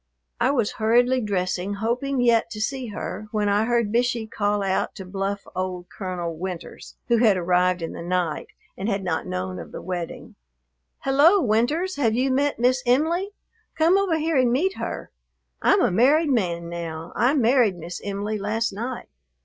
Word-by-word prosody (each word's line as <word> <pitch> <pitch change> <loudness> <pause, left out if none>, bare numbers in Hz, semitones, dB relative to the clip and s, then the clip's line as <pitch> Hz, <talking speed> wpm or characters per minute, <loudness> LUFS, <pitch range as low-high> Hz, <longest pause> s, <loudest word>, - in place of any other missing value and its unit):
I 240 +2 +3
was 240 -6 +1
hurriedly 245 +3 +3
dressing, 190 -1 -1
hoping 245 +5 -1
yet 235 -2 +3
to 215 - -7
see 255 +3 -2
her, 210 -1 -6
when 210 -1 0
I 205 +2 +2
heard 235 -3 +1
Bishey 240 -1 +1
call 205 -2 -1
out 190 -1 -1
to 190 - -8
bluff 195 +2 -3
old 180 -1 -4
Colonel 180 -4 -4
Winters, 180 +1 -7
who 235 - +3
had 220 -4 +4
arrived 180 0 +2
in 165 - -4
the - - -7
night 175 -2 -1 0.3
and 195 +4 -3
had 195 -2 -1
not 180 -3 -2
known 90 0 -4
of - - -9
the - - -6
wedding, 175 -2 -6 0.7
"Hello! 290 +9 +5
Winters, 295 - +1
have 230 -6 +2
you 260 +2 +1
met 280 +2 +1
Miss 255 +2 +2
Em'ly? 325 +10 +2 0.5
Come 325 +3 +4
over 390 -5 +2
here 320 -1 0
and 255 -2 +3
meet 360 +10 +1
her. - - -5 0.5
I'm 395 - +4
a - - +3
married 285 - +4
man 170 -8 0
now. 165 -1 -6
I 255 +5 +3
married 240 -6 +3
Miss 170 +1 -7
Em'ly 205 +1 -3
last 215 +2 -1
night." 240 +5 -5
220 Hz, 175 wpm, -24 LUFS, 185-255 Hz, 0.7 s, Hello